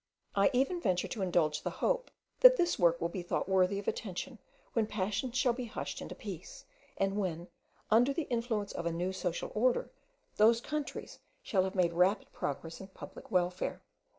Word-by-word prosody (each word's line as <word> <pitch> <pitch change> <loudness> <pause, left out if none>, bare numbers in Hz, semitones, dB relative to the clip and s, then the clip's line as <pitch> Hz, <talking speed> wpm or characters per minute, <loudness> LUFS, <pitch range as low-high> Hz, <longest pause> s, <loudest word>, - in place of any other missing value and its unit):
I 200 0 +5
even 275 +8 +1
venture 180 - +1
to 220 - -5
indulge 160 -5 +1
the - - -2
hope - - 0 0.3
that - - +9
this 345 -1 +1
work 170 -2 +4
will 170 - 0
be 185 +1 -4
thought 175 - -2
worthy 190 0 +3
of 200 - -6
attention 220 +4 -4 0.3
when 225 -2 +1
passions 215 +5 -2
shall 250 -1 +3
be 250 0 -4
hushed 225 - -5
into - - -7
peace, - - -8 0.3
and 195 +1 0
when, 175 -3 -2 0.4
under 240 +5 +5
the 310 +4 -1
influence 230 -5 -2
of 170 - -3
a - - 0
new 175 +3 -2
social 180 -2 -3
order, 245 +3 +1 0.5
those 225 +2 +6
countries 300 +3 -5 0.2
shall 190 -3 +2
have 190 - -4
made 175 -2 +2
rapid 185 +4 +2
progress 160 +5 -4
in 190 - -8
public 190 - -11
welfare. 180 0 0
195 Hz, 180 wpm, -32 LUFS, 180-240 Hz, 0.5 s, that